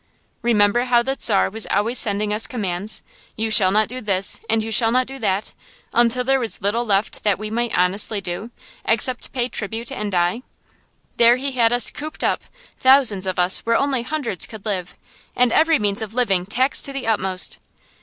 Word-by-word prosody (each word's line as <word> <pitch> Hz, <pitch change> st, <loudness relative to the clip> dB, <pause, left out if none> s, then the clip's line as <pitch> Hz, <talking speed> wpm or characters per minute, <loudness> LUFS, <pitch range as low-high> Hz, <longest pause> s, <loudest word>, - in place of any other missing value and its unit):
Remember 230 Hz, +1 st, +2 dB
how 240 Hz, -1 st, +2 dB
the 270 Hz, +2 st, -2 dB
Czar 200 Hz, -3 st, +3 dB
was 220 Hz, +1 st, -1 dB
always 220 Hz, +5 st, +1 dB
sending 210 Hz, -1 st, 0 dB
us 215 Hz, +1 st, +2 dB
commands, 205 Hz, -3 st, -2 dB, 0.3 s
you 220 Hz, 0 st, -3 dB
shall 195 Hz, -4 st, +6 dB
not 215 Hz, +3 st, +2 dB
do 255 Hz, +2 st, -7 dB
this 195 Hz, -2 st, +1 dB
and 220 Hz, 0 st, +1 dB
you 225 Hz, -, -6 dB
shall 225 Hz, +1 st, +4 dB
not 255 Hz, +1 st, +1 dB
do 270 Hz, +1 st, -9 dB
that, 200 Hz, -2 st, -2 dB, 0.4 s
until 240 Hz, +1 st, +2 dB
there 270 Hz, +1 st, +1 dB
was 230 Hz, -3 st, +1 dB
little 210 Hz, +5 st, -1 dB
left 205 Hz, -2 st, -2 dB
that 205 Hz, -3 st, +1 dB
we 215 Hz, +1 st, -7 dB
might 235 Hz, +1 st, -2 dB
honestly 195 Hz, +4 st, +1 dB
do, 195 Hz, +4 st, -6 dB, 0.3 s
except 235 Hz, +3 st, 0 dB
pay 245 Hz, -2 st, -1 dB
tribute 225 Hz, 0 st, -6 dB
and 210 Hz, -1 st, -5 dB
die. 175 Hz, +5 st, 0 dB, 0.8 s
There 235 Hz, 0 st, +6 dB
he 275 Hz, +2 st, -3 dB
had 235 Hz, -3 st, +2 dB
us 245 Hz, -2 st, +3 dB
cooped 310 Hz, +1 st, -5 dB
up, -, -, 0 dB, 0.4 s
thousands 260 Hz, -8 st, +3 dB
of 185 Hz, -, -3 dB
us 180 Hz, +1 st, +4 dB
where 230 Hz, 0 st, 0 dB
only 275 Hz, -3 st, 0 dB
hundreds 245 Hz, -, -2 dB
could 220 Hz, -2 st, -12 dB
live, 185 Hz, -4 st, -4 dB, 0.4 s
and 245 Hz, -1 st, +2 dB
every 325 Hz, 0 st, +3 dB
means 205 Hz, 0 st, -1 dB
of 220 Hz, 0 st, -7 dB
living 195 Hz, -8 st, +1 dB
taxed 255 Hz, +6 st, +1 dB
to 275 Hz, -, -4 dB
the 275 Hz, -1 st, -5 dB
utmost. 190 Hz, -4 st, +1 dB
225 Hz, 195 wpm, -20 LUFS, 200-245 Hz, 0.8 s, shall